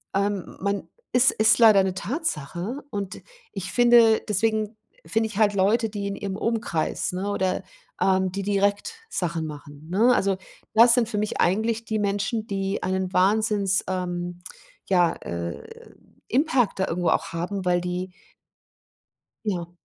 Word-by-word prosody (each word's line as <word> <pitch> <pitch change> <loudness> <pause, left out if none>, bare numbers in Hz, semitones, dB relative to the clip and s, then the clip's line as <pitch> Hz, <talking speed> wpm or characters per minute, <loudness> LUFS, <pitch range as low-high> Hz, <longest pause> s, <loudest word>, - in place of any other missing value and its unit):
ähm, 200 -3 -1
man 200 +1 -2 0.2
ist 250 +1 +5
ist 220 +2 +4
leider 215 -4 +7
'ne 190 -1 -1
Tatsache 205 - -3
und 200 -3 -5 0.3
ich 185 -2 -5
finde 240 -2 +5
deswegen 215 +1 0 0.3
finde 225 0 0
ich 215 -2 -8
halt 210 -2 +3
Leute, 215 +4 +2
die 200 -1 -4
in 200 - -3
ihrem 195 -2 -4
Umkreis, 225 -9 -1
ne, 190 +3 -3
oder, 190 -2 -1 0.4
ähm, 190 -1 +2
die 195 - -3
direkt 200 - 0 0.2
Sachen 170 -3 -2
machen, 145 0 -10
ne, 225 +7 +4
also, 195 -4 +1 0.4
das 230 +2 +7
sind 240 -3 +2
für 215 -2 -3
mich 210 0 -2
eigentlich 220 +5 +1
die 220 -1 -2
Menschen, 205 +2 -1
die 195 0 -2
einen 190 0 -2
Wahnsinns, 200 0 +2
ähm, 175 -1 -3 0.5
ja, 175 -3 +3
äh, 85 -3 -5 0.6
Impact 255 -6 +1
da 190 - +1
irgendwo 175 +1 -1
auch - - +1
haben, 180 +4 -3
weil 180 -1 +2
die 180 +1 -4 1.3
Ja. 175 -4 -3
200 Hz, 150 wpm, -24 LUFS, 180-220 Hz, 1.3 s, leider